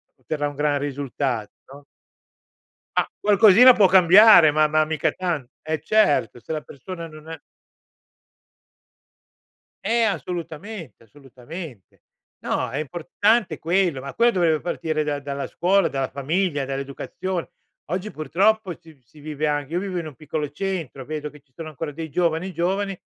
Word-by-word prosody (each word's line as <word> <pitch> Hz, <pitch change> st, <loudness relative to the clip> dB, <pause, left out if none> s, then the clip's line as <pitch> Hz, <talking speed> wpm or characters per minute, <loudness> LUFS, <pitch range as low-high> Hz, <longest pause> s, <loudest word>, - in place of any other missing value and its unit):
otterrà 145 Hz, -1 st, -3 dB
un 145 Hz, -, -11 dB
gran 145 Hz, 0 st, +1 dB
risultat 135 Hz, -5 st, -3 dB, 0.2 s
no? 140 Hz, +1 st, -13 dB, 1.1 s
A -, -, +2 dB
qualcosina 210 Hz, +4 st, +7 dB
può 205 Hz, -5 st, +5 dB
cambiare, 185 Hz, -1 st, +7 dB
ma 155 Hz, +1 st, +3 dB
ma 155 Hz, 0 st, +2 dB
mica 155 Hz, -1 st, 0 dB
tan 170 Hz, -8 st, -3 dB, 0.2 s
eh 155 Hz, -1 st, -3 dB
certo, 145 Hz, -, +2 dB
se -, -, -7 dB
la 155 Hz, -, -2 dB
persona 170 Hz, +5 st, -9 dB
non 155 Hz, 0 st, -13 dB
è 160 Hz, -, -7 dB, 2.5 s
Eh, 230 Hz, +3 st, +2 dB
assolutamente, 175 Hz, -, -5 dB
assolutamente. 135 Hz, -, -12 dB, 0.4 s
No, 125 Hz, -, -1 dB
è 135 Hz, -, -5 dB
importante 180 Hz, -, 0 dB
quello, 170 Hz, -4 st, +1 dB
ma 140 Hz, +1 st, -8 dB
quello 235 Hz, +1 st, +4 dB
dovrebbe 170 Hz, -7 st, +1 dB
partire 160 Hz, -3 st, -2 dB
da 150 Hz, -1 st, -2 dB
dalla 140 Hz, 0 st, -5 dB
scuola, 185 Hz, +1 st, +2 dB
dalla 135 Hz, -1 st, -2 dB
famiglia, 145 Hz, +1 st, -1 dB
dall'educazione. 140 Hz, +6 st, -5 dB, 0.4 s
Oggi 185 Hz, +6 st, -4 dB
purtroppo, 190 Hz, +6 st, 0 dB
si 160 Hz, -, -16 dB
v 145 Hz, -, -27 dB
si 125 Hz, +6 st, -21 dB
vive 150 Hz, 0 st, -3 dB
anche 145 Hz, 0 st, -2 dB
io 175 Hz, -, 0 dB
vivo 190 Hz, -2 st, -4 dB
in 165 Hz, -, -5 dB
un 150 Hz, -, -9 dB
piccolo 150 Hz, +1 st, -4 dB
centro. 160 Hz, -5 st, -4 dB
Vedo 150 Hz, +1 st, -5 dB
che 150 Hz, -, -16 dB
ci 135 Hz, -1 st, -42 dB
sono 160 Hz, +4 st, -8 dB
ancora 155 Hz, +1 st, -6 dB
dei 160 Hz, +2 st, -7 dB
giovani, 170 Hz, +3 st, 0 dB
giovani, 195 Hz, +3 st, -1 dB
155 Hz, 150 wpm, -23 LUFS, 145-185 Hz, 2.5 s, qualcosina